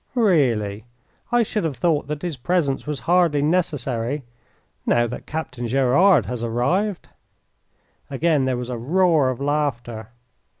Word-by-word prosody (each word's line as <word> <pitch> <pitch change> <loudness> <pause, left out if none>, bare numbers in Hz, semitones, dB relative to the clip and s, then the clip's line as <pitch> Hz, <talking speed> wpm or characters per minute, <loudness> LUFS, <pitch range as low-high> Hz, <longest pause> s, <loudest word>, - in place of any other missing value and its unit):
"Really, 120 - +1 0.5
I 240 -1 +4
should 210 -2 -2
have 150 -6 -2
thought 155 -1 +1
that 150 +1 -5
his 175 -4 -3
presence 140 +1 -1
was 150 -2 -3
hardly 170 -5 +2
necessary 145 -5 -1 0.6
now 120 0 +2
that 120 +1 -7
Captain 125 -6 -4
Gerard 135 - +4
has 120 +3 -4
arrived." 170 - -1 1.0
Again 145 0 +1
there 130 -1 0
was 125 0 -5
a 120 - -4
roar 160 +1 +3
of 130 - -3
laughter. 135 -6 -2
140 Hz, 135 wpm, -22 LUFS, 120-170 Hz, 1.0 s, I